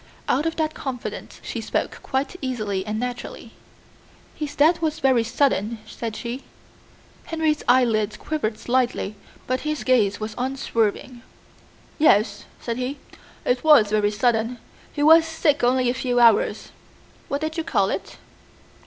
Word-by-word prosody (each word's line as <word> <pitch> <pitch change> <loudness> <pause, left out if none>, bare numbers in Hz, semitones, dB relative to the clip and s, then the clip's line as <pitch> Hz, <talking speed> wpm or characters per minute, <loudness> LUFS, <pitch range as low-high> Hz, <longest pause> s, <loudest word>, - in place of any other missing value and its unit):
Out 300 +4 +1
of 325 - -2
that 310 -1 -1
confidence 255 -3 -6
she - - -4
spoke - - -2
quite 270 +5 -2
easily 215 -8 -2
and 215 +1 -2
naturally. 245 0 -6 0.8
"His 295 -1 -5
death 330 +4 +4
was 310 -1 0
very 260 -4 +3
sudden," 230 -2 0
said 220 0 -6
she. 245 +3 -5 0.8
Henry's 315 -2 0
eyelids 225 -4 +3
quivered 255 -9 -3
slightly 245 -4 0 0.3
but 255 0 -1
his 305 -5 -3
gaze 215 -5 +2
was 215 0 -4
unswerving. 245 -2 -1 0.8
"Yes," 205 -8 +3
said 235 -1 -4
he, 255 +3 -3 0.5
"it 245 0 +1
was 295 -10 +6
very 210 -1 +2
sudden. 230 +2 0 0.3
He 290 - -2
was 320 +2 +8
sick 320 -3 0
only 250 +1 +3
a 245 - +2
few 250 -1 0
hours." 230 -2 +3 0.6
"What 280 +1 -2
did 315 0 -3
you 325 - -2
call - - +1
it?" - - -5
250 Hz, 145 wpm, -23 LUFS, 225-295 Hz, 0.8 s, was